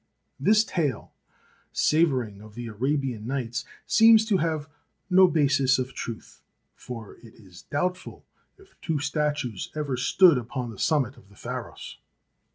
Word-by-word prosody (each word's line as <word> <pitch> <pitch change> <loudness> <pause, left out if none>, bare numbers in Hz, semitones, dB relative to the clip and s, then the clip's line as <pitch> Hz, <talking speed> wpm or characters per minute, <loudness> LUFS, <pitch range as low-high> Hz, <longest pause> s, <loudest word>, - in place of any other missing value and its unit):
This 215 +1 +4
tale, 160 - -2 0.6
savouring 130 -11 +1
of 105 0 -14
the 120 0 -6
Arabian 125 0 -2
Nights, 125 -2 -3 0.2
seems 225 0 +6
to 210 -4 +2
have 155 -3 -1 0.4
no 185 +1 +7
basis 140 -5 +3
of 130 0 -3
truth, 115 -2 -8 0.3
for 115 -4 -9
it 115 -2 -16
is 90 -5 -15
doubtful 180 +5 -3 0.3
if 390 -1 -21
two 160 -2 -1
statues 145 - -2
ever 145 -4 -2
stood 145 +5 +5
upon 120 0 -5
the 105 - -12
sum 155 -3 +2
mit 125 +3 -11
of 100 - -19
the 100 - -20
Pharos. - - -7
135 Hz, 145 wpm, -26 LUFS, 120-160 Hz, 0.6 s, no